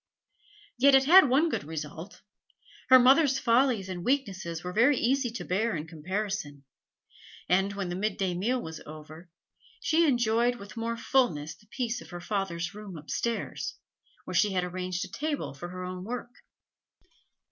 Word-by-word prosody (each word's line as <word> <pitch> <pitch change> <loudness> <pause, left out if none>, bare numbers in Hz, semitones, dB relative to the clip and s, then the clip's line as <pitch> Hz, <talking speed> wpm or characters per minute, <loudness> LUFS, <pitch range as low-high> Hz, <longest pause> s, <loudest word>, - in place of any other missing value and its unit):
Yet 275 +1 +6
it 270 0 +5
had 340 -1 +8
one 285 +6 +4
good 320 - -2
result; 160 +4 -7 0.7
her 260 - +10
mother's 270 +2 +5
follies 235 -5 +2
and 180 -2 -5
weaknesses 190 - -1
were 180 0 -5
very 245 +6 +4
easy 260 +1 +1
to 230 - -6
bear 215 +5 0
in 155 -1 -4
comparison, 170 -2 -4 0.8
and, 195 +2 +2
when 200 -3 -4
the 175 - -3
midday 195 -2 -1
meal 225 +9 0
was 160 -7 -7
over, 155 +3 -11 0.5
she 330 0 +3
enjoyed 240 -2 +2
with 200 -4 -11
more 230 0 -3
fulness 230 - +1
the 210 - -23
peace 240 +1 -3
of - - -13
her 175 - -7
father's 175 -2 -3
room 205 -4 -9
upstairs, 230 +9 -3 0.5
where - - -6
she 210 -2 +3
had 180 -1 +1
arranged 180 0 -3
a - - -9
table 295 - -3
for 155 +6 -8
her 185 0 -7
own 180 0 -6
work. 240 +3 -6
205 Hz, 160 wpm, -28 LUFS, 175-245 Hz, 0.8 s, her